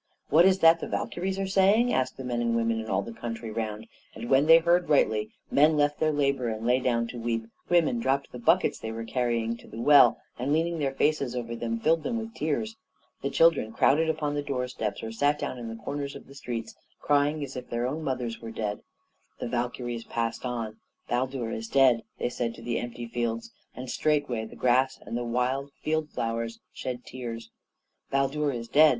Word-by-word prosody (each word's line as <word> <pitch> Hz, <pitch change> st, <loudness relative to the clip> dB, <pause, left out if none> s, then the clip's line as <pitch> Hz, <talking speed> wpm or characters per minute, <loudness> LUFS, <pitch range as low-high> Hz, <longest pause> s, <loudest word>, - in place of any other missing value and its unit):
"What 165 Hz, +4 st, +6 dB
is 190 Hz, 0 st, +5 dB
that 165 Hz, 0 st, +7 dB
the -, -, -4 dB
Valkyries 190 Hz, +2 st, -2 dB
are 195 Hz, -, -1 dB
saying?" 200 Hz, +5 st, +4 dB
asked 130 Hz, -, 0 dB
the 130 Hz, -, -6 dB
men 120 Hz, -1 st, -2 dB
and 115 Hz, -1 st, +1 dB
women 115 Hz, -1 st, +1 dB
in 110 Hz, -, -5 dB
all -, -, +1 dB
the 115 Hz, -, -8 dB
country 115 Hz, -1 st, -5 dB
round, 110 Hz, -1 st, -4 dB, 0.3 s
and 115 Hz, +3 st, -6 dB
when 135 Hz, +3 st, +5 dB
they 165 Hz, 0 st, +10 dB
heard 175 Hz, +1 st, +2 dB
rightly, 110 Hz, -7 st, +3 dB, 0.2 s
men 150 Hz, +2 st, +5 dB
left 145 Hz, 0 st, +2 dB
their 155 Hz, 0 st, +2 dB
labor 140 Hz, -4 st, +1 dB
and 110 Hz, 0 st, -4 dB
lay 125 Hz, +2 st, +4 dB
down 120 Hz, -2 st, +1 dB
to 120 Hz, -, -7 dB
weep 115 Hz, -1 st, -1 dB, 0.2 s
women 165 Hz, -9 st, +3 dB
dropped 135 Hz, +3 st, 0 dB
the 125 Hz, -, -8 dB
buckets 120 Hz, -, +3 dB
they 110 Hz, -, -5 dB
were 115 Hz, 0 st, -5 dB
carrying 115 Hz, -1 st, -1 dB
to -, -, -16 dB
the 110 Hz, -, -9 dB
well, 135 Hz, -1 st, +7 dB, 0.2 s
and, 135 Hz, +4 st, 0 dB
leaning 165 Hz, +1 st, +1 dB
their 135 Hz, -2 st, -1 dB
faces 140 Hz, -4 st, +1 dB
over 115 Hz, -1 st, -3 dB
them, 115 Hz, 0 st, -3 dB
filled 160 Hz, +6 st, +3 dB
them 235 Hz, +5 st, -2 dB
with 225 Hz, 0 st, -5 dB
tears. 215 Hz, +9 st, -2 dB, 0.4 s
The 140 Hz, -, -1 dB
children 160 Hz, -10 st, +3 dB
crowded 160 Hz, +7 st, +3 dB
upon 155 Hz, -2 st, -1 dB
the 145 Hz, -, -1 dB
doorsteps, 125 Hz, -6 st, -3 dB
or 110 Hz, -, -4 dB
sat 145 Hz, +6 st, +2 dB
down 130 Hz, -, -4 dB
at 120 Hz, -, -6 dB
the 115 Hz, -, -5 dB
corners 140 Hz, 0 st, -4 dB
of -, -, -10 dB
the 135 Hz, -, -14 dB
streets, 115 Hz, -5 st, -5 dB, 0.3 s
crying 145 Hz, +1 st, +2 dB
as 135 Hz, -1 st, -7 dB
if 125 Hz, -1 st, -7 dB
their 120 Hz, +1 st, -1 dB
own 150 Hz, +5 st, -3 dB
mothers 125 Hz, -5 st, -2 dB
were 115 Hz, -, -6 dB
dead. 105 Hz, -2 st, -3 dB, 0.6 s
The -, -, -4 dB
Valkyries 120 Hz, -1 st, -3 dB
passed 115 Hz, +1 st, -2 dB
on. 115 Hz, -3 st, -4 dB, 0.3 s
"Baldur 125 Hz, -1 st, -1 dB
is 115 Hz, 0 st, -4 dB
dead!" 130 Hz, -2 st, +4 dB, 0.2 s
they -, -, -1 dB
said 120 Hz, -1 st, -3 dB
to 115 Hz, -, -12 dB
the 120 Hz, 0 st, -1 dB
empty 120 Hz, 0 st, -6 dB
fields; 115 Hz, -1 st, -3 dB, 0.2 s
and 130 Hz, +1 st, -7 dB
straightway 145 Hz, -5 st, 0 dB
the 110 Hz, -, -11 dB
grass 130 Hz, +1 st, +2 dB
and 115 Hz, -, -5 dB
the 120 Hz, -, -1 dB
wild 125 Hz, +4 st, -1 dB
field 155 Hz, 0 st, 0 dB
flowers 115 Hz, -1 st, -3 dB
shed 125 Hz, -1 st, -5 dB
tears. 115 Hz, -3 st, -7 dB, 0.6 s
"Baldur 140 Hz, +2 st, +1 dB
is 115 Hz, -2 st, -5 dB
dead!" 155 Hz, +5 st, +6 dB
125 Hz, 210 wpm, -27 LUFS, 115-145 Hz, 0.6 s, they